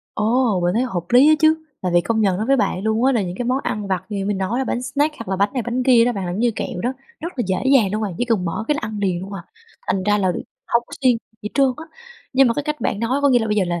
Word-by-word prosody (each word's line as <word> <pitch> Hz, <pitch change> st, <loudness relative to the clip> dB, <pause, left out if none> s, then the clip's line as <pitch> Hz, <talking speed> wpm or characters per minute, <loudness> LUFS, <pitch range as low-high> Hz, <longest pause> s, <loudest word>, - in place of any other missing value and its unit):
Ô, 220 Hz, -2 st, +1 dB
mình 175 Hz, +1 st, +1 dB
thấy 235 Hz, -, +2 dB
hợp 190 Hz, -9 st, -2 dB
lý 260 Hz, +4 st, +7 dB
á 310 Hz, -, +7 dB
chứ. 315 Hz, 0 st, +4 dB, 0.2 s
Tại 180 Hz, -1 st, -1 dB
vì 175 Hz, -, +6 dB
công 220 Hz, +5 st, -1 dB
nhận 195 Hz, -4 st, +2 dB
nói 215 Hz, +4 st, -2 dB
với 275 Hz, +1 st, +4 dB
bạn 190 Hz, -6 st, 0 dB
luôn 220 Hz, +3 st, +1 dB
á 270 Hz, -, +4 dB
là 230 Hz, -, +1 dB
những 180 Hz, -1 st, -5 dB
cái 245 Hz, -, -3 dB
món 255 Hz, +2 st, +1 dB
ăn 210 Hz, -1 st, -3 dB
vặt 185 Hz, -2 st, -1 dB
như 210 Hz, -, -4 dB
nãy 195 Hz, -, -2 dB
mình 200 Hz, -1 st, -1 dB
nói 195 Hz, +6 st, -1 dB
là 265 Hz, -, 0 dB
bánh 245 Hz, -, -2 dB
snack 290 Hz, +4 st, 0 dB
hoặc 230 Hz, -, -8 dB
là 190 Hz, -, -1 dB
bánh 200 Hz, +2 st, +1 dB
này 250 Hz, -3 st, -2 dB
bánh 240 Hz, +2 st, -2 dB
kia 245 Hz, -3 st, +5 dB
đó 245 Hz, -, +1 dB
bạn, 195 Hz, -4 st, -4 dB
làm 175 Hz, +2 st, -3 dB
như 240 Hz, +1 st, +2 dB
kẹo 180 Hz, -, -4 dB
đó, 245 Hz, -, 0 dB, 0.3 s
rất 335 Hz, +2 st, -5 dB
là -, -, +2 dB
dễ 185 Hz, 0 st, 0 dB, 0.2 s
dàng 210 Hz, -8 st, +4 dB
luôn 215 Hz, +1 st, -1 dB
bạn. 200 Hz, -4 st, -3 dB
Chỉ -, -, +1 dB
cần 225 Hz, -7 st, 0 dB
mở 175 Hz, +5 st, -3 dB
cái 300 Hz, -, +2 dB
ăn 215 Hz, -1 st, -5 dB
liền 185 Hz, -4 st, 0 dB
luôn 195 Hz, +2 st, -8 dB
à, 195 Hz, -3 st, -7 dB, 0.4 s
thành 190 Hz, -, 0 dB
ra 210 Hz, +1 st, +2 dB
là 190 Hz, -2 st, +1 dB, 0.4 s
hông 235 Hz, -, +2 dB
có -, -, -20 dB
siêng 250 Hz, -3 st, +4 dB, 0.3 s
gì 210 Hz, -, -3 dB
trơn 275 Hz, -1 st, +4 dB
á. 315 Hz, -, -8 dB, 0.5 s
Nhưng 265 Hz, -1 st, +5 dB
mà 230 Hz, -, +1 dB
cái 290 Hz, -, -2 dB
cách 300 Hz, -1 st, -3 dB
bạn 205 Hz, -2 st, -1 dB
nói 250 Hz, +5 st, 0 dB
có 285 Hz, -, +5 dB
nghĩa 250 Hz, -3 st, +5 dB
là 225 Hz, -, -2 dB
bây 210 Hz, -1 st, 0 dB
giờ 200 Hz, -, +3 dB
là 175 Hz, 0 st, -2 dB
220 Hz, 330 wpm, -21 LUFS, 195-255 Hz, 0.5 s, lý